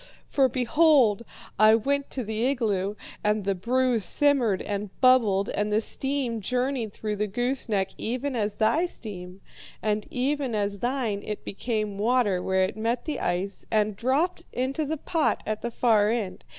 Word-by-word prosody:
For 270 -2 +3
behold! 250 -3 +3 0.4
I 215 +1 +7
went 280 +5 0
to 260 - -3
the 220 +3 -1
igloo, 210 -7 0 0.3
and 210 0 +1
the 195 +1 +1
brew 245 +5 +1
simmered 240 -2 +3
and 205 0 -3
bubbled, 225 -7 +4
and 210 0 -1
the 210 - +3
steam 260 -1 -2
journeyed 250 0 -1
through 210 0 -4
the 210 +1 0
gooseneck 230 -3 -1
even 255 +4 -2
as 210 -2 -1
thy 235 +11 +2
steam, 190 - -9 0.4
and 210 -1 -1
even 265 -1 -1
as 200 -1 -1
thine 240 -4 -1
it 210 -1 -6
became 215 -1 -3
water 215 -4 +2
where 190 0 +1
it 185 - -2
met 230 +2 -2
the 305 -3 -3
ice, 185 +3 -2
and 215 -1 +1
dropped 300 - 0
into 265 +5 -1
the 315 +2 -2
pot 320 +2 0
at 215 0 -3
the 235 - -2
far 220 -3 +3
end. 220 -5 -3
225 Hz, 165 wpm, -26 LUFS, 205-260 Hz, 0.4 s, I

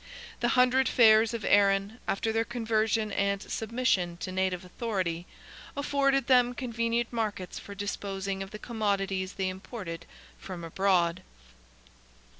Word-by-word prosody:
The 240 - +1
hundred 255 +1 +4
fairs 220 -1 +6
of 230 -3 -4
Erin—after 200 +2 +2
their 225 +1 +1
conversion 225 -2 0
and 200 0 0
submission 215 -6 -1
to 185 - -4
native 185 -1 -1
authority—afforded 235 - -2
them 245 -1 +4
convenient 235 -1 -1
markets 210 -6 -3
for 200 - -10
disposing 195 -1 -3
of 195 - -5
the 210 - -8
commodities 200 -4 -1
they 190 -1 -2
imported 185 -3 -6 0.3
from 180 -3 -7
abroad. 180 0 +1
205 Hz, 115 wpm, -29 LUFS, 190-235 Hz, 0.3 s, fairs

